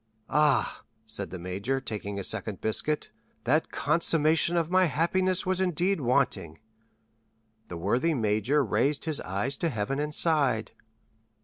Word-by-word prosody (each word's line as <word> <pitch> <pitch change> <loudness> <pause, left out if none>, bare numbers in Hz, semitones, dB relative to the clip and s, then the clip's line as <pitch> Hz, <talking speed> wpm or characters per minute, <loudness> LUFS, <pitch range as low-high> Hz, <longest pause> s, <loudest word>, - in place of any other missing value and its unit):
"Ah," 150 -6 +2 0.2
said 100 -3 -5
the 95 - -6
major, 95 +9 -3
taking 105 -5 -5
a 100 - -3
second 100 +1 -3
biscuit, 145 +7 0 0.3
"that 150 +7 +1
consummation 160 +2 +2
of 165 0 -1
my 185 0 +4
happiness 180 +5 0
was 185 0 0
indeed 180 0 +1
wanting." 85 - 0 1.1
The 85 - -7
worthy 130 - +1
major 115 +5 +1
raised 130 +9 +1
his 155 -3 0
eyes 100 +9 -3
to 170 - 0
heaven 125 +2 -2
and 150 +1 -2
sighed. 140 -9 +3
140 Hz, 135 wpm, -27 LUFS, 110-165 Hz, 1.1 s, my